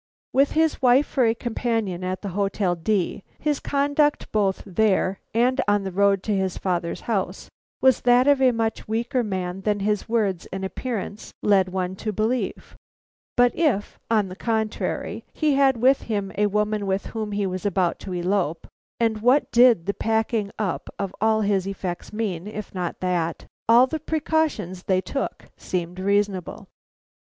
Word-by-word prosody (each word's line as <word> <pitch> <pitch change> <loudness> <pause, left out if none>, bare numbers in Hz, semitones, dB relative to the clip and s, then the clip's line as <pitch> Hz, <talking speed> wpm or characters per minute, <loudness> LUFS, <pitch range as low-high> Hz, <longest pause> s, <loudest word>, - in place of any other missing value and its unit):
With 275 +2 +3
his 320 -1 +2
wife 255 +3 +5
for 260 -3 +1
a 225 - +2
companion 225 -6 -2
at 185 +2 -3
the 200 - -3
Hotel 195 -1 0
D, 195 +3 -1 0.2
his 295 -2 -1
conduct 285 +1 +1
both 200 -3 +1
there 195 -1 +1
and 250 +4 +2
on 205 -1 +2
the 190 - -4
road 195 0 +2
to 210 - 0
his 190 -1 -1
father's 175 -3 -2
house 195 -4 -3 0.3
was 260 -1 +4
that 245 +1 +5
of 285 -2 +4
a 260 -1 +6
much 225 -1 -2
weaker 235 +3 0
man 190 -3 -3
than 205 0 0
his 210 +2 -1
words 205 -6 0
and 190 0 -5
appearance 215 0 -5
led 195 -3 +4
one 185 0 -2
to 215 - -3
believe; 220 +5 -2 0.6
but 245 0 +4
if, 285 -11 0
on 215 -3 +2
the 185 - -8
contrary, 220 0 -2
he 305 -2 +1
had 270 -2 +4
with 260 +4 +4
him 200 -4 -3
a 210 +1 +2
woman 210 0 0
with 190 +1 -1
whom 215 -2 -3
he 205 0 -1
was 185 -1 -3
about 185 -4 0
to 190 - -8
elope 175 -2 -1 0.3
(and 225 -2 +1
what 255 +5 +3
did 240 -8 +5
the 200 - 0
packing 220 -1 0
up 200 -5 -2
of 195 -1 -3
all 220 0 +3
his 200 -2 +1
effects 185 -3 -5
mean, 205 -5 -3
if 210 0 -7
not 180 -2 -4
that?), 175 -3 -1 0.2
all 235 +2 +8
the 315 +4 -4
precautions 305 - -1
they 185 0 +1
took 275 +8 -4
seemed 180 0 -4
reasonable. 200 -2 -1
210 Hz, 170 wpm, -24 LUFS, 190-240 Hz, 0.6 s, all